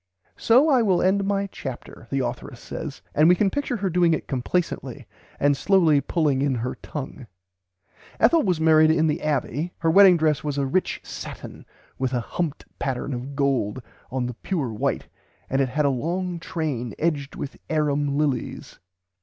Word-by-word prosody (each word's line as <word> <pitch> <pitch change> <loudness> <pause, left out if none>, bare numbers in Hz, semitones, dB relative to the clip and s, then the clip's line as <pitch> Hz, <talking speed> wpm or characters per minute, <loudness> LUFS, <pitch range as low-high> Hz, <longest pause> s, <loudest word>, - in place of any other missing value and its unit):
"So 255 +7 +4
I 265 -5 +4
will 190 -5 +3
end 195 +1 +2
my 200 0 0
chapter," 130 -10 -8
the 135 -2 0
authoress 120 +1 -6
says; 155 -3 -7
and 155 +3 +5
we 180 - +6
can 195 +1 +1
picture 280 -4 -2
her 195 -2 -1
doing 170 -1 +3
it - - -7
complacently, 145 +7 -2 0.3
and 145 0 +3
slowly 160 -2 +3
pulling 145 -2 0
in 140 -2 +1
her 120 +1 -2
tongue. 135 -3 -7 0.9
Ethel 315 +9 +5
was 180 - 0
married 155 -1 +5
in 160 0 +3
the 155 +2 0
Abbey. 150 +2 -1
Her 165 - 0
[Pg - - -2
xvi] - - -2
wedding 195 -3 +8
dress 155 -4 +1
was 145 -2 -3
"a 140 - +1
rich 180 +8 -1
satin - - -9 0.3
with 130 -1 -1
a 125 - +1
humped 155 +5 -4
pattern 135 0 -2
of 130 +3 -6
gold 130 -5 0 0.3
on 130 -1 -2
the 125 - -4
pure 135 - -3
white 105 - -2 0.4
and 135 +1 +2
it 135 - +1
had 150 +3 0
a - - +4
long 175 +6 -2
train 145 - -3
edged 150 -4 -1
with 140 - -6
Airum 145 -2 0
lillies." 145 -5 -2
150 Hz, 180 wpm, -24 LUFS, 135-175 Hz, 0.9 s, wedding